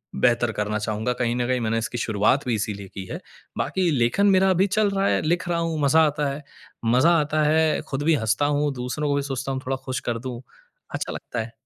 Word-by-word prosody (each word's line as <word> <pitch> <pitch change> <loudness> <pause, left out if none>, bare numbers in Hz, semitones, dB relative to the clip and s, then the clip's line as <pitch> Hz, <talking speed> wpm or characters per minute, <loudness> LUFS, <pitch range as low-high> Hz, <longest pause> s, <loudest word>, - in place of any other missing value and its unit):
बेहतर 120 -1 +2
करना 105 0 -2
चाहूँगा। 110 +3 -2
कहीं 120 -1 0
न 120 0 -1
कहीं 130 0 +1
मैंने 115 0 0
इसकी 115 +1 -3
शुरुआत 110 +4 +1
भी 120 - +1
इसीलिए 100 -2 -4
की 95 - -6
है। - - -4 0.4
बाकी 185 -2 0
लेखन 130 +9 +2
मेरा 190 0 +4
अभी 190 +2 +3
चल 210 +1 +2
रहा 195 0 0
है - - +2
लिख 175 +3 0
रहा 170 -1 +1
हूँ 165 -2 -1
मज़ा 145 +3 +4
आता 150 0 -1
है। 145 +2 -8 0.4
मज़ा 125 +9 +4
आता 150 +1 0
है 155 +1 +2
ख़ुद 135 +1 -2
भी 160 +1 +4
हँसता 110 +2 +1
हूँ 145 0 +1
दूसरों 130 +4 -3
को 140 - +2
भी 140 - +1
सोचता 135 +1 -3
हूँ 130 0 -3
थोड़ा 135 +1 -1
खुश 130 -2 -2
कर 115 -1 -1
दूँ। 125 0 -6 0.5
अच्छा - - -3
लगता 120 - -6
है। 115 +1 -7
135 Hz, 230 wpm, -24 LUFS, 115-155 Hz, 0.5 s, मेरा